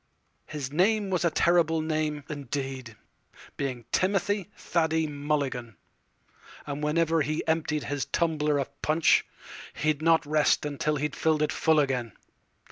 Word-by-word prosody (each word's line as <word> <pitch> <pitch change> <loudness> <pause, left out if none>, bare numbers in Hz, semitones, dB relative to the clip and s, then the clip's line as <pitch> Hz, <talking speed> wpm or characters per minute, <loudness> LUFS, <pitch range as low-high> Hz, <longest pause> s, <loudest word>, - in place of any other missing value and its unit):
His 140 -4 -5
name 195 +5 +2
was 180 -2 +1
a 170 - +4
terrible 165 0 +3
name, 155 -2 -1
indeed, 135 -4 -5 0.6
Being 130 -5 -4
Timothy 195 0 0
Thady 160 -1 0
Mulligan; 140 -6 -2 0.9
And 145 0 -5
whenever 165 +1 +2
he 155 +2 -2
emptied 155 -2 0
his 145 -1 -2
tumbler 150 -3 0
of 140 - -2
punchHe 155 +1 +4 0.6
'd 155 -1 +1
not 165 0 +3
rest 150 0 +2
till 150 0 +1
he 150 +1 -1
fill'd 155 +2 +1
it 150 - 0
full 160 -1 +3
again. 130 -5 -1
150 Hz, 130 wpm, -27 LUFS, 145-160 Hz, 0.9 s, a